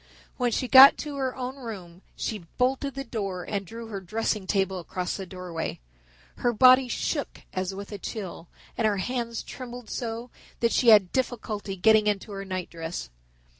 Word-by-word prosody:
When 245 -2 +1
she 255 - -1
got 265 +2 +10
to 295 -2 -5
her 260 -2 -1
own 260 +1 -5
room 190 -8 -8
she 210 -6 -4
bolted 265 +2 0
the 275 - -3
door 195 -8 -4
and 200 -3 -3
drew 230 +3 -8
her 200 -3 -5
dressing 210 +1 -2
table 190 -2 0
across 180 +1 -3
the 190 -2 -6
doorway. 180 -3 -5 0.6
Her 245 - +1
body 255 +3 +7
shook 240 - -3
as 185 +1 -2
with 200 +2 -8
a 205 - -6
chill 190 -5 -6 0.3
and 225 - +2
her 205 -2 +1
hands 235 +2 -3
trembled 245 -2 -8
so 235 0 -4 0.3
that 235 -1 +2
she 245 - +2
had 205 -5 +7
difficulty 220 -6 -2
getting 215 +3 +4
into 205 +1 -1
her 195 -1 -5
nightdress. 170 - -5
215 Hz, 170 wpm, -27 LUFS, 190-245 Hz, 0.6 s, got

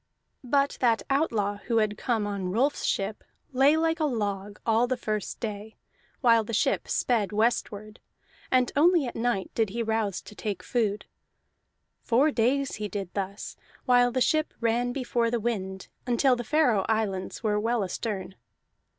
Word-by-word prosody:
But 280 +3 +1
that 235 -3 +2
outlaw 220 -8 +1
who 230 -2 +1
had 215 -1 +2
come 225 -3 -1
on 200 -3 -3
Rolf's 255 +10 0
ship 200 +2 -1 0.3
lay 275 +4 +5
like 325 +1 +1
a 310 - +2
log 205 -6 -3
all 230 +2 +3
the 255 0 -1
first 215 -4 -3
day, 215 -1 -6 0.5
while 230 -3 +5
the 220 +1 -4
ship - - +1
sped 220 -6 0
westward; 215 -1 -1 0.5
and 255 -1 +2
only 330 +1 +4
at 240 - -5
night 225 -5 -1
did 225 -3 +1
he 230 +4 -2
rouse 220 -4 -1
to - - -12
take 205 0 -4
food. 210 -4 -1 1.0
Four 265 +6 +3
days 270 +3 +1
he 210 0 -3
did 195 -2 -5
thus, 200 0 -4 0.3
while 245 -1 +4
the 255 +1 -1
ship 310 +4 +1
ran 235 +1 +1
before 245 -2 0
the 240 0 0
wind 190 -4 -3 0.2
until 250 +2 +3
the 240 - -4
Faroe 250 -6 +2
Islands 210 -2 -1
were 210 -1 +1
well 230 0 0
astern. 195 0 -4
230 Hz, 160 wpm, -27 LUFS, 205-250 Hz, 1.0 s, lay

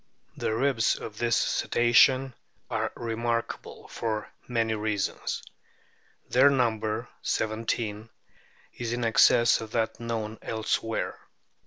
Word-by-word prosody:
The 110 - -1
ribs 130 -2 +2
of 110 -1 -8
this 120 -1 +2
Cetacean 130 +2 +3 0.4
are - - -1
remarkable 115 0 -3
for 110 -2 -3 0.2
many 115 -2 0
reasons. 105 -2 -2 0.8
Their 130 +3 +6
number 115 -3 0
(seventeen) 110 0 -2 0.6
is 120 -1 -4
in 120 0 -2
excess 115 +1 +5
of 110 0 -8
that 110 -1 -1
known 115 -2 -4
elsewhere. 110 0 -2
115 Hz, 105 wpm, -27 LUFS, 110-120 Hz, 0.8 s, Their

